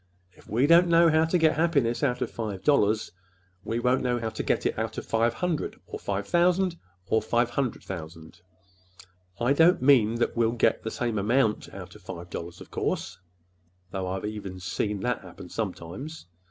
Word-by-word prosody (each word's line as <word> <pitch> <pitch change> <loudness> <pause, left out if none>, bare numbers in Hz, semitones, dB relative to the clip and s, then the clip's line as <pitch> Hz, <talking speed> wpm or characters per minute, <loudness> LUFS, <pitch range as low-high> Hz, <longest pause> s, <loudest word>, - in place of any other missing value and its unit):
If - - -20
we 120 +6 +2
don't 170 +3 +6
know 170 0 +6
how 160 +1 +4
to 165 +3 +2
get 160 -2 +4
any - - -6
happiness 140 -8 +2
out 125 -3 +1
of - - -5
five 105 -5 -5
dollars, 110 -7 +2 0.5
we 115 - -2
won't 125 +2 +2
know 125 -1 0
how 115 -1 -2
to 110 - -4
get - - 0
it - - 0
out - - -3
of - - -4
five 115 +1 +1
hundred, 175 -4 -2
or - - -7
five 100 0 -3
thousand, 180 +1 +2 0.3
or 110 - +2
five 120 +2 +1
hundred 130 -1 -2
thousand, 80 -3 -8
Mr. - - -23
Smith. 90 +1 -25 0.4
I 140 - +5
don't 165 +2 +5
mean 120 -5 +5
that 120 - 0
we'll 115 -1 +2
get 120 - +2
the 110 - -4
same 115 -2 -2
amount 110 +2 +1
out 95 -2 -9
of 105 - -15
five 90 -1 -8
dollars, 85 +1 -6
of - - -12
course,—though 90 +1 -6
I've 95 +1 -3 0.4
seen 105 - -1
even 105 -2 -4
that - - -1
happen - - -11
sometimes! 135 - -5
115 Hz, 195 wpm, -27 LUFS, 95-140 Hz, 0.5 s, don't